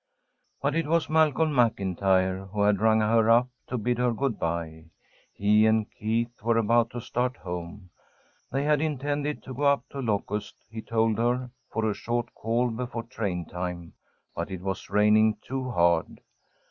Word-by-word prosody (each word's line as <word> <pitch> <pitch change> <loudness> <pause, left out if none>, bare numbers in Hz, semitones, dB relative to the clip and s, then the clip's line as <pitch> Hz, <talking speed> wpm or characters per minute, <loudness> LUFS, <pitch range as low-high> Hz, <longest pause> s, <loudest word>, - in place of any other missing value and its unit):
But 140 +1 +1
it 165 -1 0
was 165 0 +1
Malcolm 160 0 +3
MacIntyre 95 -5 +1
who 100 +1 -1
had 100 -1 +3
rung 110 0 +4
her 110 +1 +3
up, 120 +2 +5 0.2
to 125 - -3
bid 120 +2 -1
her 125 -1 +2
good 125 0 -2
bye. 80 -1 -3 0.5
He 105 +2 +3
and 110 -1 +1
Keith 115 +2 -2
were 115 +1 +2
about 115 +1 +3
to 125 - -6
start 125 +2 -2
home. 90 +1 -7 0.6
They 135 +2 0
had 150 0 +2
intended 145 -1 -2
to 130 - -8
go 130 - -7
up 140 0 +2
to 140 - -6
Locust, 105 -3 -2 0.2
he 110 -1 -6
told 115 -1 0
her, 125 +1 0 0.2
for 110 -1 0
a 105 - +1
short 120 +2 -3
call 120 +2 0
before 120 0 -4
train 100 -8 -3
time, 90 -1 -6 0.4
but - - -4
it 95 -2 -6
was 95 0 -4
raining 105 +1 +4
too 130 -1 -4
hard. 85 -6 +1
115 Hz, 170 wpm, -27 LUFS, 100-125 Hz, 0.6 s, up